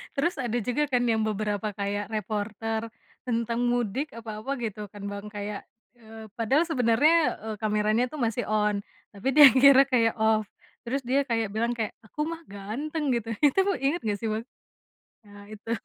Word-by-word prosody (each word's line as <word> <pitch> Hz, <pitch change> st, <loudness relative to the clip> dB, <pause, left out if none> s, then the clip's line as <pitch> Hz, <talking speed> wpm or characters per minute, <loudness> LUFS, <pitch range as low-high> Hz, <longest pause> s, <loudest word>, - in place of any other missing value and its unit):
Terus 340 Hz, +6 st, 0 dB
ada 240 Hz, -1 st, -1 dB
juga 250 Hz, +6 st, 0 dB
kan 245 Hz, -1 st, +2 dB
yang 225 Hz, -1 st, +2 dB
beberapa, 215 Hz, 0 st, -2 dB
kayak 205 Hz, +1 st, -3 dB
reporter 220 Hz, +1 st, -3 dB, 0.4 s
tentang 235 Hz, -1 st, -1 dB
mudik 245 Hz, +3 st, 0 dB
apa 220 Hz, -2 st, -7 dB
apa 265 Hz, +5 st, -4 dB
gitu 210 Hz, -2 st, -4 dB
kan 205 Hz, -1 st, -10 dB
Bang, 200 Hz, +1 st, -7 dB
kayak, 205 Hz, 0 st, -5 dB, 0.3 s
eee, 220 Hz, -1 st, -12 dB
padahal 260 Hz, +8 st, +3 dB
sebenernya, 295 Hz, +4 st, +3 dB
eee, 220 Hz, -1 st, -4 dB
kameranya 215 Hz, +2 st, +1 dB
tuh 305 Hz, -, -7 dB
masih 235 Hz, +1 st, 0 dB
on, 210 Hz, -1 st, +1 dB, 0.3 s
tapi 200 Hz, +6 st, -5 dB
dia 295 Hz, -2 st, +11 dB
kira 275 Hz, 0 st, +7 dB
kayak 230 Hz, -4 st, +2 dB
off, 220 Hz, 0 st, +3 dB, 0.4 s
terus 265 Hz, +4 st, -2 dB
dia 265 Hz, +3 st, +2 dB
kayak 225 Hz, -3 st, 0 dB
bilang 230 Hz, +2 st, 0 dB
kayak, 220 Hz, -2 st, -2 dB, 0.2 s
"Aku 300 Hz, +6 st, -2 dB
mah 330 Hz, 0 st, -5 dB
ganteng," 270 Hz, +10 st, -3 dB
gitu, 230 Hz, -1 st, -3 dB
itu 290 Hz, +5 st, +4 dB, 0.2 s
inget 285 Hz, +6 st, 0 dB
nggak 205 Hz, -2 st, -1 dB
sih 225 Hz, -, -2 dB
Bang? 220 Hz, +2 st, -3 dB, 0.8 s
Nah 205 Hz, 0 st, -14 dB
itu. 215 Hz, +1 st, -8 dB
225 Hz, 170 wpm, -27 LUFS, 210-255 Hz, 0.8 s, dia